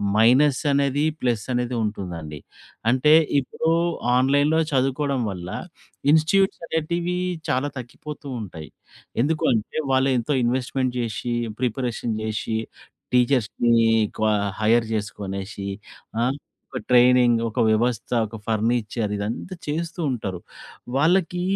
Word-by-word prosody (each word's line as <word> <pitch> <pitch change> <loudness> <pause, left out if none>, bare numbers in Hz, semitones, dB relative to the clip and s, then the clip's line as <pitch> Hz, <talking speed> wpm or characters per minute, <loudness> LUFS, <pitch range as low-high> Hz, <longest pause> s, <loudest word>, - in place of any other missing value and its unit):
Minus 130 +5 +5
అనేది, 140 +1 +1 0.2
plus 120 -4 0
అనేది 125 0 -1
ఉంటుందండి. 85 -8 -5 0.5
అంటే 145 +4 +4 0.3
ఇప్పుడు 160 +4 -2 0.5
ఆన్లైన్‌లో 145 +5 +3
చదువుకోవడం 135 0 +1
వల్ల. 90 -1 -7 0.6
ఇన్‌స్టి‌ట్యూట్స్ 170 +5 +3
అనేటివి 170 +3 -1 0.3
చాలా 130 +3 +1
తగ్గిపోతూ 145 +4 -9
ఉంటాయి. 80 -6 -8 0.5
ఎందుకు 155 +2 0
అంటే, 110 +6 -2 0.2
వాళ్ళు 130 +1 +3
ఎంతో 135 +5 -1
ఇన్వెస్ట్‌మెంట్ 125 +1 -1
జేశి, 120 +1 -2 0.3
ప్రిపరేషన్ 120 -2 -1
జేశి. 110 +1 -2 0.5
టీచర్స్‌ని 120 -2 +2 0.5
క్వ 110 - 0 0.4
హైర్ 115 +1 +4
చేసుకొనేసి. 100 -1 -5 0.5
ఆ! - - +2 0.5
ఒక 130 - -3
ట్రైనింగ్, 125 -1 +5
ఒక 115 - -4
వ్యవస్థ, 115 +1 +1 0.2
ఒక 110 +1 -9
ఫర్నిచర్ 110 -1 0
ఇదంతా 110 - -4
చేస్తూ 165 +3 -3
ఉంటారు. 100 -8 -3 0.6
వాళ్ళకి 175 +4 +2
125 Hz, 105 wpm, -23 LUFS, 110-145 Hz, 0.6 s, Minus